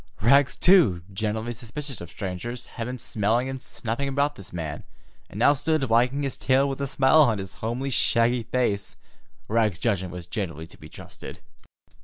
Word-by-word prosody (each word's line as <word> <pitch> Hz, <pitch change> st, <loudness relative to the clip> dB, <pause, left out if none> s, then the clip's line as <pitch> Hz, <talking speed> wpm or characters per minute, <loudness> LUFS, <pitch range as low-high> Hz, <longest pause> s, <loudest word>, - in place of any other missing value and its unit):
Rags, 135 Hz, +6 st, +4 dB
too, 145 Hz, -, +5 dB
generally 110 Hz, +3 st, -2 dB
suspicious 120 Hz, +2 st, -6 dB
of 85 Hz, -, -8 dB
strangers, 100 Hz, +7 st, -5 dB
had 115 Hz, -1 st, -6 dB
been 125 Hz, +1 st, -4 dB
smelling 115 Hz, +2 st, 0 dB
and 135 Hz, -1 st, -5 dB
snuffing 120 Hz, +1 st, -4 dB
about 140 Hz, +2 st, +1 dB
this 95 Hz, -1 st, -12 dB
man, 80 Hz, -4 st, -5 dB, 0.5 s
and -, -, -10 dB
now 145 Hz, -, +5 dB
stood 150 Hz, +1 st, 0 dB
wagging 125 Hz, +4 st, +2 dB
his 135 Hz, -3 st, -2 dB
tail 135 Hz, +2 st, +3 dB
with 135 Hz, 0 st, -4 dB
a 140 Hz, -, -1 dB
smile 135 Hz, +4 st, +4 dB
on 120 Hz, -8 st, +3 dB
his 95 Hz, -1 st, -6 dB
homely, 125 Hz, +5 st, -2 dB
shaggy 120 Hz, 0 st, +2 dB
face. 115 Hz, -4 st, -1 dB, 0.5 s
Rags's 110 Hz, -4 st, +1 dB
judgment 95 Hz, -5 st, -1 dB
was 90 Hz, -1 st, -7 dB
generally 85 Hz, -5 st, -4 dB
to 85 Hz, -, -14 dB
be 75 Hz, -, -12 dB
trusted. -, -, -10 dB
115 Hz, 175 wpm, -25 LUFS, 100-135 Hz, 0.5 s, too